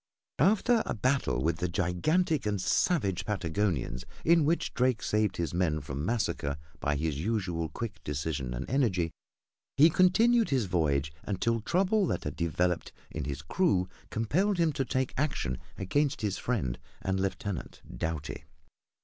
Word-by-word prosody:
After 220 Hz, -, +4 dB
a -, -, -1 dB
battle 105 Hz, -, +1 dB
with 80 Hz, +1 st, +1 dB
the 90 Hz, +1 st, -1 dB
gigantic 120 Hz, -, +1 dB
and 105 Hz, -1 st, 0 dB
savage 95 Hz, -, +1 dB
Patagonians, 85 Hz, -, -1 dB, 0.2 s
in 165 Hz, -2 st, +5 dB
which 165 Hz, +3 st, 0 dB
Drake 125 Hz, -2 st, +1 dB
saved 105 Hz, -2 st, +1 dB
his 85 Hz, -3 st, -2 dB
men 85 Hz, -3 st, +1 dB
from 70 Hz, 0 st, -5 dB
massacre 90 Hz, -9 st, -1 dB, 0.2 s
by 75 Hz, 0 st, 0 dB
his 75 Hz, -1 st, -1 dB
usual 90 Hz, -4 st, -1 dB
quick 115 Hz, -3 st, -6 dB
decision 75 Hz, -3 st, -3 dB
and -, -, -4 dB
energy, 95 Hz, -11 st, +1 dB, 0.7 s
he 155 Hz, +4 st, +7 dB
continued 225 Hz, +7 st, +4 dB
his 130 Hz, -6 st, +2 dB
voyage 75 Hz, -5 st, 0 dB
until 115 Hz, +4 st, 0 dB
trouble 190 Hz, -, +2 dB
that -, -, -1 dB
had -, -, -4 dB
developed 85 Hz, +1 st, 0 dB, 0.2 s
in -, -, -4 dB
his 70 Hz, +1 st, -4 dB
crew 95 Hz, -, +2 dB, 0.2 s
compelled 175 Hz, -, +1 dB
him 165 Hz, -3 st, +2 dB
to 135 Hz, -1 st, -1 dB
take 130 Hz, 0 st, -1 dB
action 125 Hz, -, -1 dB, 0.2 s
against 140 Hz, +7 st, 0 dB
his 105 Hz, -3 st, -1 dB
friend 65 Hz, -, -1 dB, 0.2 s
and 95 Hz, 0 st, 0 dB
lieutenant, 95 Hz, -3 st, -3 dB
Doughty. 75 Hz, +2 st, -4 dB
100 Hz, 150 wpm, -30 LUFS, -, 0.7 s, he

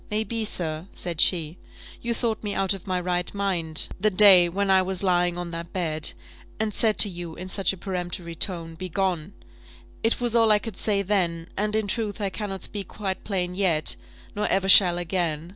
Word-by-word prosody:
"May 215 Hz, +1 st, -1 dB
be, 225 Hz, 0 st, -4 dB
sir," 160 Hz, -4 st, -1 dB
said 170 Hz, -3 st, -2 dB
she, 165 Hz, -2 st, +2 dB, 0.4 s
"you 235 Hz, 0 st, -2 dB
thought 225 Hz, -2 st, -2 dB
me 205 Hz, -1 st, -3 dB
out 195 Hz, 0 st, 0 dB
of 195 Hz, -1 st, -10 dB
my 185 Hz, -1 st, -1 dB
right 180 Hz, 0 st, -2 dB
mind 175 Hz, -6 st, -1 dB
the 215 Hz, +3 st, +2 dB
day 185 Hz, -3 st, +6 dB
when 195 Hz, +2 st, -1 dB
I 190 Hz, 0 st, +5 dB
was 190 Hz, +1 st, -2 dB
lying 175 Hz, -2 st, +1 dB
on 175 Hz, -1 st, -5 dB
that 170 Hz, 0 st, -7 dB
bed, 160 Hz, -4 st, -1 dB, 0.5 s
and 215 Hz, -1 st, -2 dB
said 220 Hz, 0 st, +1 dB
to -, -, +9 dB
you 175 Hz, -3 st, -8 dB
in 185 Hz, -, -8 dB
such 195 Hz, +1 st, +1 dB
a 195 Hz, -, -8 dB
peremptory 175 Hz, -2 st, -5 dB
tone, 165 Hz, -1 st, -3 dB
'Begone!' 185 Hz, 0 st, -3 dB, 0.7 s
It 225 Hz, -, +1 dB
was 240 Hz, -1 st, 0 dB
all 225 Hz, -1 st, +4 dB
I 210 Hz, -, +5 dB
could 215 Hz, -1 st, -7 dB
say 200 Hz, -1 st, 0 dB
then; 175 Hz, -4 st, -1 dB
and, 210 Hz, +1 st, -1 dB
in 220 Hz, -1 st, 0 dB
truth, 210 Hz, 0 st, -3 dB
I 200 Hz, -2 st, -2 dB
cannot 195 Hz, -2 st, -6 dB
speak 200 Hz, -2 st, -5 dB
quite 190 Hz, -3 st, -5 dB
plain 180 Hz, -3 st, -2 dB
yet; 180 Hz, -5 st, +2 dB, 0.4 s
nor 210 Hz, +1 st, -1 dB
ever 190 Hz, 0 st, 0 dB
shall 180 Hz, -2 st, +9 dB
again. 170 Hz, -2 st, -3 dB
185 Hz, 200 wpm, -24 LUFS, 175-205 Hz, 0.7 s, to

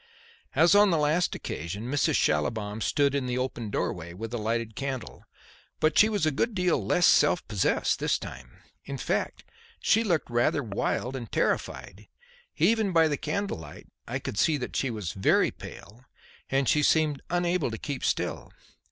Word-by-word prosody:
As 165 Hz, +4 st, +5 dB
on 205 Hz, 0 st, +6 dB
the 170 Hz, -, +2 dB
last 155 Hz, +4 st, +1 dB
occasion, 85 Hz, +7 st, -5 dB
Mrs. 140 Hz, +3 st, +1 dB
Schallibaum 105 Hz, +8 st, 0 dB
stood 140 Hz, +3 st, +2 dB
in 140 Hz, -2 st, -1 dB
the 125 Hz, 0 st, -2 dB
open 125 Hz, -4 st, -3 dB
doorway 85 Hz, -3 st, -3 dB
with 115 Hz, +4 st, -6 dB
a 120 Hz, -, -2 dB
lighted 115 Hz, 0 st, -2 dB
candle. 135 Hz, -2 st, -5 dB, 0.5 s
But 155 Hz, +1 st, +2 dB
she 215 Hz, -, +6 dB
was 205 Hz, -7 st, 0 dB
a 155 Hz, -, +2 dB
good 220 Hz, -, -1 dB
deal 180 Hz, -2 st, +1 dB
less 175 Hz, -, +2 dB
self 175 Hz, -, +4 dB
possessed 105 Hz, -3 st, +1 dB
this -, -, +1 dB
time. -, -, -11 dB, 0.2 s
In -, -, -6 dB
fact -, -, -2 dB, 0.4 s
she 225 Hz, -, +3 dB
looked 170 Hz, -, 0 dB
rather 120 Hz, +4 st, +1 dB
wild 120 Hz, +4 st, -2 dB
and 120 Hz, -4 st, -7 dB
terrified. -, -, -2 dB, 0.5 s
Even 220 Hz, -3 st, +2 dB
by 165 Hz, -2 st, +4 dB
the 150 Hz, -, 0 dB
candle 200 Hz, +6 st, -3 dB
light 75 Hz, -2 st, -12 dB, 0.2 s
I -, -, -2 dB
could 105 Hz, -, -5 dB
see 160 Hz, -3 st, +3 dB
that 125 Hz, -, -6 dB
she 135 Hz, -, 0 dB
was 105 Hz, -7 st, -4 dB
very 95 Hz, -, +2 dB
pale 115 Hz, +6 st, -12 dB, 0.4 s
and 135 Hz, -1 st, +1 dB
she 150 Hz, -, +3 dB
seemed 150 Hz, -1 st, +2 dB
unable 175 Hz, -3 st, 0 dB
to 110 Hz, -, -5 dB
keep 140 Hz, +2 st, -5 dB
still. -, -, -2 dB
135 Hz, 175 wpm, -27 LUFS, 110-165 Hz, 0.5 s, on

